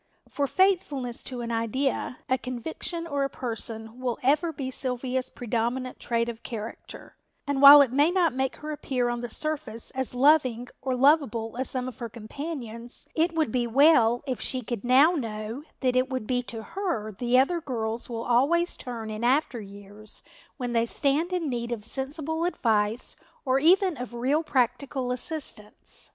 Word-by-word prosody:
For 285 -1 -1
faithfulness 295 -10 +1
to 250 -2 -5
an 235 0 -4
idea, 245 +3 -1
a 260 - +3
conviction 315 +7 -5
or 285 -4 -1
a 275 - 0
person 225 -1 -5
will 250 -2 -2
ever 300 +6 +3
be 270 -4 -5
Sylvia's 255 0 -2
predominant 245 +2 -2
trait 235 -1 0
of 235 -1 -6
character, 225 -1 -8 0.3
and 280 -1 -1
while 285 +1 +11
it 260 - -3
may 290 +5 +4
not 350 -4 +2
make 265 0 -1
her 305 0 -7
appear 255 -4 -1
on 240 0 -2
the 240 - -5
surface 305 -4 -3
as 260 -1 -2
loving 255 -3 +3
or 260 -1 -1
lovable 250 -5 +2
as 260 - -1
some 255 -1 -2
of 255 - -8
her 235 -2 -4
companions, 240 0 -6
it 330 +1 +1
would 315 -7 +1
be 245 0 0
well 245 -2 +5
if 260 -3 -3
she 255 -1 -1
could 230 -2 -4
now 260 +6 +6
know 225 -4 -4 0.2
that 255 -2 +1
it 255 +1 +2
will 260 -1 -1
be 245 +3 -1
to 230 -2 -7
her 335 - -3
the 240 +5 +1
other 335 +6 +3
girls 230 -5 -3
will 230 -1 -4
always 285 +10 +2
turn 230 -3 -6
in 215 +2 -5
after 255 -1 +2
years 205 +1 -10 0.3
when 245 -2 -3
they 230 0 +2
stand 295 +7 +1
in 355 -3 -1
need 240 -2 -3
of 220 -3 -4
sensible 305 +6 -2
advice 225 -8 0 0.3
or 260 0 +3
even 365 +2 +4
of 245 -1 -6
real 265 +6 +1
practical 260 -2 0
assistance. 250 -5 -2
255 Hz, 175 wpm, -27 LUFS, 235-285 Hz, 0.3 s, while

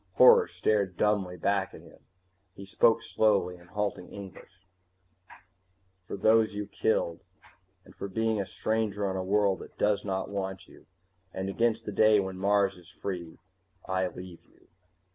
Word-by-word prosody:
Horror 475 -1 +7
stared 100 -4 0
dumbly 100 -4 +1
back 100 -1 0
at - - -12
him. - - -17 0.6
He 100 - -9
spoke 115 +3 +3
slowly, 100 -6 +1
in 85 0 -18
halting 100 -1 -3
English: 95 -1 -12 1.4
"For - - -5
those 110 +1 +3
you 105 0 -3
killed, 85 -6 -1 0.7
and - - -16
for - - -6
being 110 +1 0
a 95 - -5
stranger 105 -2 -1
on 95 - -2
a 95 - -2
world 100 0 +2
that - - -12
does 105 -1 +1
not 95 -1 -2
want 95 -2 -4
you, - - -18 0.4
and 95 +1 -4
against 115 +2 0
the - - -4
day 110 +1 +5
when 95 -1 -4
Mars 100 -1 +2
is 90 - -16
free, 85 -4 -6 0.5
I 95 0 0
leave 90 -1 -10
you." - - -28
100 Hz, 160 wpm, -29 LUFS, 95-105 Hz, 1.4 s, Horror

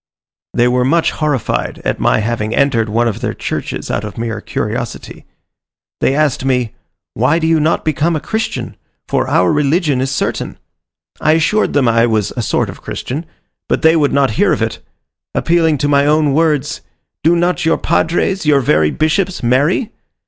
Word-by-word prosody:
They 120 - +3
were 125 0 +2
much 165 +6 +2
horrified 150 -6 -2
at - - -1
my - - +2
having 110 0 -2
entered 120 -6 +2
one 115 +3 +1
of 110 - -3
their - - -2
churches - - -4
out 100 - -2
of 105 -2 -7
mere 115 -2 -3
curiosity. - - -5 0.7
They 135 - +1
asked 150 -4 +1
me, 125 -4 0 0.4
"Why 130 +8 +2
do 165 - -1
you 165 0 +3
not 155 +2 0
become 160 +2 +1
a - - -1
Christian 220 +8 -4 0.3
for - - 0
our - - +2
religion 150 -1 +1
is 135 - -1
certain?" 140 - -2 0.6
I 155 - +3
assured 165 +7 +1
them 140 -4 +2
I 115 +1 +3
was 110 -3 0
a 120 - -2
sort - - 0
of - - -9
Christian; 150 +6 -5 0.4
but - - 0
they 160 +1 +5
would 150 -3 +2
not 140 -3 +2
hear - - +4
of - - +1
it - - -3 0.6
appealing 165 -2 +2
to 145 - 0
my 140 0 +3
own 150 -1 +3
words, 155 -2 0 0.4
"Do 165 +2 +4
not 175 +1 0
your 165 0 +2
padres, 190 +3 0
your 150 -2 +4
very 80 -10 +2
bishops, 175 - -1
marry?" 145 - +1
145 Hz, 180 wpm, -16 LUFS, 120-160 Hz, 0.7 s, they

